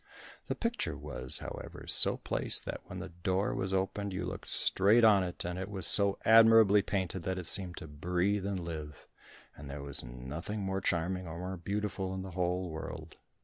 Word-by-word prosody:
The - - -2
picture 230 - -3
was, 65 -3 -5
however, - - -9
so - - +8
placed - - -3
that - - -6
when 90 - -8
the 95 0 -7
door 95 +3 -2
was 95 0 -3
opened 95 +1 -2
you 95 - -4
looked - - -7
straight 105 +5 +4
on 105 -4 +5
it, 90 -1 -6
and 90 +1 -4
it 95 +1 -5
was 95 -3 -3
so 100 -1 +6
admirably 110 -2 +6
painted 95 -2 -3
that 95 +2 -3
it 90 - -5
seemed 90 -1 0
to - - -8
breathe 90 +6 -1
and 100 -1 -2
live, 80 -3 -8 0.5
and 70 -1 -11
there 70 0 -7
was 70 -1 0
nothing 65 - -6
more 95 0 -3
charming 90 +1 -2
or 80 +1 -7
more 90 +2 -5
beautiful 100 +1 -4
in 95 - -5
the 95 - -8
whole 90 +1 -2
world. 80 0 -8
95 Hz, 190 wpm, -31 LUFS, 85-100 Hz, 0.5 s, so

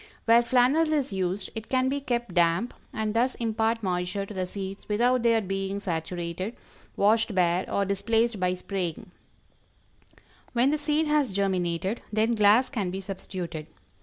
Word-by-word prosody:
Where 230 +1 +6
flannel 260 +7 +3
is 280 -7 0
used, 190 +1 -2
it 220 -1 -7
can 260 0 +2
be 280 +2 -1
kept 240 -6 -2
damp 175 +7 +2 0.2
and 215 -1 -2
thus 245 +3 +1
impart 225 0 0
moisture 180 +1 -1
to 210 - -9
the 185 -2 -2
seeds 195 +1 -7
without 245 +4 +2
their 230 -1 +3
being 195 0 -3
saturated, 175 +2 -4 0.4
washed 220 +1 +3
bare, 180 0 +1
or 200 - +1
displaced 225 +3 +1
by 180 0 +1
spraying. 180 -3 -4 1.4
When 250 +3 +3
the 305 - 0
seed 300 +1 +1
has 300 -6 +2
germinated, 185 +1 -1
then 220 +2 +2
glass 215 +3 +5
can 210 -9 -2
be 190 +2 -4
substituted. 185 -4 -6
205 Hz, 155 wpm, -27 LUFS, 185-235 Hz, 1.4 s, Where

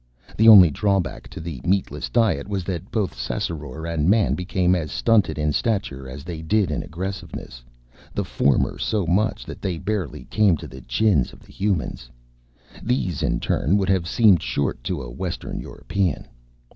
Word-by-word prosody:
The 110 - +4
only 95 -7 +10
drawback 100 +2 -1
to - - -9
the 80 -6 -6
meatless 95 +2 -1
diet 110 - +1
was 100 -3 -2
that 85 -3 -5
both 105 -4 -1
Ssassaror 75 +4 -4
and 85 -1 0
Man 105 0 +3
became 90 0 +1
as 85 -4 -1
stunted 115 -7 +2
in 75 -1 0
stature 70 - -1
as 70 +3 -8
they 85 -1 -6
did 90 +2 +1
in 75 - -1
aggressiveness, 90 -8 -6 0.5
the - - -2
former 70 -1 +1
so 105 -4 0
much 95 +6 +1
so - - -20
that - - -10
they 90 -3 -2
barely 95 -3 -3
came 105 -6 +4
to - - -8
the 65 +1 -11
chins 70 - +1
of - - -15
the - - -18
Humans. 95 -11 -2 0.7
These, 100 - -1
in - - 0
turn, 85 +11 +1
would 95 -2 0
have 95 -3 +1
seemed 100 -5 +5
short 60 0 -2
to - - -2
a - - -8
Western - - -5
European. 95 -7 -2
90 Hz, 175 wpm, -23 LUFS, 75-100 Hz, 0.7 s, only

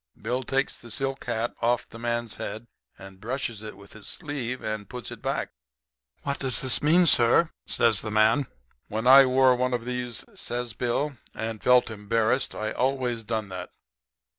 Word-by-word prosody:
Bill 120 +4 -2
takes 135 +2 -1
the 120 - -11
silk 135 +3 -3
hat 115 0 -2
off 120 +1 +1
the 115 - -12
man's 120 -1 -2
head 110 +3 -6 0.3
and 95 -1 -13
brushes 120 -2 -3
it 110 -2 -8
with 100 0 -14
his 110 -2 -11
sleeve 130 -6 -4
and 110 -2 -4
puts 125 -1 -7
it - - -9
back. - - -2 0.7
"'What 140 0 -2
does 130 -2 0
this 130 -2 +4
mean, 170 +4 +5
sir?' 160 +4 +4 0.2
says 115 -4 +2
the 110 - -4
man. 110 +6 +3 0.4
"'When 110 +2 -3
I 135 +1 +9
wore 130 0 +5
one 125 0 0
of 120 -1 -5
these,' 125 -1 -3
says 120 - -4
Bill, 130 +4 -1 0.2
'and 110 -1 -4
felt 125 -2 +4
embarrassed, 110 +4 0
I 110 0 -3
always 125 -3 -1
done 110 -2 -3
that. 90 -1 -6
120 Hz, 175 wpm, -26 LUFS, 110-130 Hz, 0.7 s, I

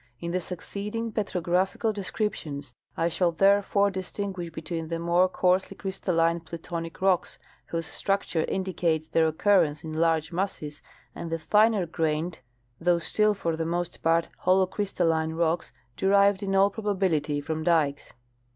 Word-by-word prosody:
In 170 0 -4
the 185 - 0
succeeding 205 +6 -5
petrographical 190 +1 0
descriptions 160 - -4 0.2
I 165 - +2
shall 170 +1 +1
therefore 200 +2 +3
distinguish 190 -1 -4
between 160 0 -5
the 165 +1 -2
more 170 +2 +3
coarsely 185 0 +1
crystalline 170 -4 0
plutonic 165 +1 -6
rocks, 190 -2 +2 0.3
whose 165 -1 -3
structure 180 0 -1
indicates 170 -4 -1
their 160 0 +3
occurrence 160 -2 +2
in 160 -1 -6
large 160 0 +1
masses, 165 -5 -3 0.3
and 170 - -6
the 165 - -1
finer 210 +5 +3
grained 160 0 -2 0.4
though 175 +1 +3
still 210 +5 +1
for 170 -4 -1
the 165 - -2
most 175 +1 -3
part 165 +1 +2
holocrystalline 185 -4 +1
rocks 170 0 0 0.2
derived 200 0 +4
in 195 -1 -1
all 195 +1 +5
probability 185 -9 0
from 155 +2 -3
dikes. 155 -4 +1
175 Hz, 135 wpm, -27 LUFS, 160-195 Hz, 0.4 s, all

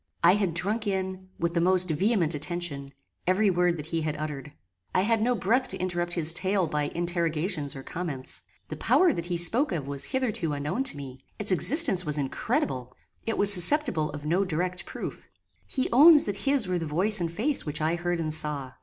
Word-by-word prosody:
I 175 +2 +6
had 195 -5 -1
drunk 210 +5 -1
in, 190 -1 -4
with 170 0 -2
the 170 - 0
most 185 +1 +4
vehement 180 0 +1
attention, 150 -2 -3 0.4
every 195 +2 +2
word 175 -1 +1
that 150 - -7
he 165 0 -3
had 155 -1 -3
uttered. 150 -2 -6 0.4
I 185 - +3
had 225 +2 +1
no 245 +2 +1
breath 235 +7 0
to - - -7
interrupt 175 -1 -3
his 165 -2 +3
tale 190 +1 0
by 150 -2 -2
interrogations 170 -3 -2
or 135 - -8
comments. 150 -7 -4 0.3
The - - -6
power 360 -4 +3
that 170 -5 -5
he 175 -1 -2
spoke 225 - +2
of 150 -6 -4
was 140 -1 -3
hitherto 220 - -2
unknown 150 - -3
to 205 - +5
me: 135 -2 -10
its 210 -1 +2
existence 190 - +4
was 150 -3 -1
incredible; 130 -2 -3 0.3
it 225 - -1
was 205 0 +9
susceptible 180 - +3
of 145 0 -8
no 175 +6 +1
direct 180 0 -3
proof. - - -8 0.4
He 260 - -1
owns 300 +4 +8
that 200 -1 -4
his 275 -7 +2
were 180 -1 -1
the 165 - -5
voice 185 +7 0
and 165 -1 -2
face 255 - -1
which 150 - -3
I 160 +1 0
heard 175 0 -2
and 155 -2 -2
saw. 150 -4 -2
175 Hz, 200 wpm, -26 LUFS, 155-200 Hz, 0.4 s, was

